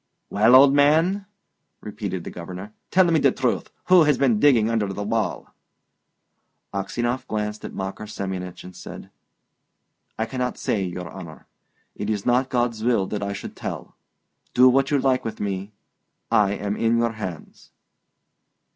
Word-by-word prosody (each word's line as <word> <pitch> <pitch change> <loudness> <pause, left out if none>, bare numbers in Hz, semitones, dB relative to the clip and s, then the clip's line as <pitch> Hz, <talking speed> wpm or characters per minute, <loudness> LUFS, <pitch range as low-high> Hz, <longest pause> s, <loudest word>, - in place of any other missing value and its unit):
"Well, 110 +5 +5
old 135 +1 +8
man," 160 +8 +3 0.5
repeated 100 -4 -5
the - - -7
Governor, 90 +4 -8 0.2
"tell 185 0 +5
me 165 -2 +3
the 135 -2 +4
truth: 125 -1 -1 0.2
who 180 -3 +6
has 150 -3 +3
been 125 -6 +2
digging 120 -6 +5
under 110 -3 0
the 100 +2 -4
wall?" 110 +2 -2 1.2
Aksionov 120 +6 -2
glanced 105 0 -3
at - - -8
Makar 95 +2 -5
Semyonich, 95 -3 -5
and 90 0 -11
said, 90 - -10 1.1
"I 110 - 0
cannot 125 +1 -3
say, 105 - -1
your 90 -2 -6
honour. 85 -5 -10 0.5
It 105 - -5
is 105 -2 -2
not 125 +2 +2
God's 120 -3 -1
will 115 -5 +2
that 105 - -3
I 100 0 -2
should - - -8
tell! - - -6 0.6
Do 125 +1 +7
what 135 +1 +2
you 145 - +2
like 130 -1 +1
with 115 - -5
me; 100 0 -3 0.6
I 100 -2 +3
am 100 0 -3
in 115 +1 +2
your 115 0 +1
hands." 95 -7 -8
110 Hz, 155 wpm, -23 LUFS, 100-130 Hz, 1.2 s, old